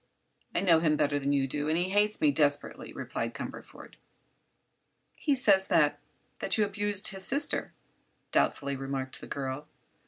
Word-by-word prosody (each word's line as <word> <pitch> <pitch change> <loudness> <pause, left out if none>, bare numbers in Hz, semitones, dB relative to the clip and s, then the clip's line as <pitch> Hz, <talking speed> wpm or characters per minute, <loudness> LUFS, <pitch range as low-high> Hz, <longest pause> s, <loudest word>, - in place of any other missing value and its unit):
"I - - +2
know 170 -4 +5
him 155 -2 +2
better 145 -1 +1
than 140 0 -1
you 140 -1 +2
do, 145 +2 -2
and 160 - +2
he 180 +2 0
hates 210 +1 +2
me 150 - +4
desperately," 145 -1 0
replied - - -4
Cumberford. - - -9 1.2
"He 290 -3 0
says 195 -7 +4
that—that - - 0
you 215 - +3
abused 205 0 -1
his 195 -2 -6
sister," 280 +8 0 0.6
doubtfully 140 0 +1
remarked 135 -1 -4
the - - -9
girl. 135 +2 -4
155 Hz, 150 wpm, -29 LUFS, 140-205 Hz, 1.2 s, know